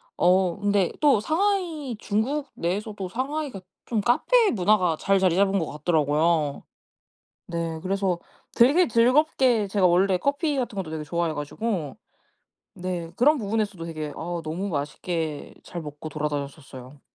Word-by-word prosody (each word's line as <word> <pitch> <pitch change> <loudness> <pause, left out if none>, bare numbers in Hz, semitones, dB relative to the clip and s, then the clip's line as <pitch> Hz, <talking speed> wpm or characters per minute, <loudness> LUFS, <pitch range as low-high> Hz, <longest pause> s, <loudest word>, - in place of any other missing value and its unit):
어 180 0 +3
근데 200 -3 +2
또 280 -8 +5
상하이 325 - -1
중국 265 +8 -1
내에서도 195 +2 -3
상하이가 265 -1 -3 0.3
좀 220 -3 0
카페 410 - +3
문화가 185 -4 +2
잘 195 0 +2
자리잡은 190 +2 +3
거 165 - 0
같더라고요. 150 -1 +1 0.9
네. 165 -1 -3
그래서 190 -2 0 0.4
되게 285 +9 +5
즐겁게 245 -2 +3
제가 195 -1 +1
원래 185 +2 +3
커피 285 - 0
같은 240 -5 -2
것도 180 -5 -4
되게 155 -1 -4
좋아해 170 0 -1
가지고 165 +3 -3 0.8
네. 180 -3 -4
그런 295 +4 +4
부분에서도 205 -4 -2
되게 155 -3 -5
아 170 +1 -4
너무 175 +6 -3
맛있게 155 +1 -3
잘 175 - -6
먹고 150 0 -8
돌아다녔었어요. 140 -2 -5
190 Hz, 305 characters per minute, -25 LUFS, 165-235 Hz, 0.9 s, 또